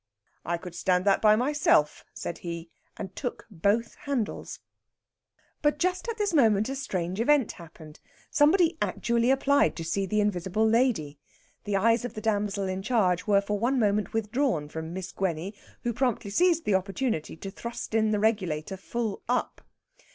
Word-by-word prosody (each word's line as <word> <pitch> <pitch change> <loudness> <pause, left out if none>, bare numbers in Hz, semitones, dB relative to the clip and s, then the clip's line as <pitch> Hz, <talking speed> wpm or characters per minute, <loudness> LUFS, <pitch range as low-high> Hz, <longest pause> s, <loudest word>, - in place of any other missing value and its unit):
"I 170 +1 -1
could 175 0 -9
stand 180 +1 +1
that 200 -1 +3
by 215 -1 +6
myself," 250 - +2
said 170 - -6
he, 170 -1 -6 0.3
and 190 -2 -7
took 245 -4 -5
both 205 +6 +1
handles. 270 -6 -3 1.0
But 295 0 +2
just 365 +5 -1
at 455 - -3
this 410 -4 0
moment 220 -8 +4
a 270 - -3
strange 185 -8 -3
event 270 0 +3
happened. 160 -2 -13 0.3
Somebody 320 +2 +4
actually 235 +1 +1
applied 280 +2 +3
to 165 - -5
see 195 +4 -1
the 210 +3 0
invisible 205 +1 +1
lady. 220 - +1 0.5
The 205 -1 -1
eyes 230 +3 +3
of 245 - -5
the - - -4
damsel 205 -2 0
in 185 0 -3
charge 190 -5 +1
were 200 -1 +4
for 205 +1 -2
one 250 +5 +1
moment 210 -4 +1
withdrawn 225 - 0
from 160 +1 -6
Miss 185 0 -5
Gwenny, 185 +1 -2 0.3
who 240 - -1
promptly 235 -5 -1
seized 340 - +3
the 210 - +2
opportunity 195 - -1
to 195 +3 -7
thrust 235 +2 -7
in 220 -1 +3
the 210 - +1
regulator 190 -5 0
"full 220 +1 -3
up." 250 - -1
210 Hz, 165 wpm, -27 LUFS, 185-245 Hz, 1.0 s, by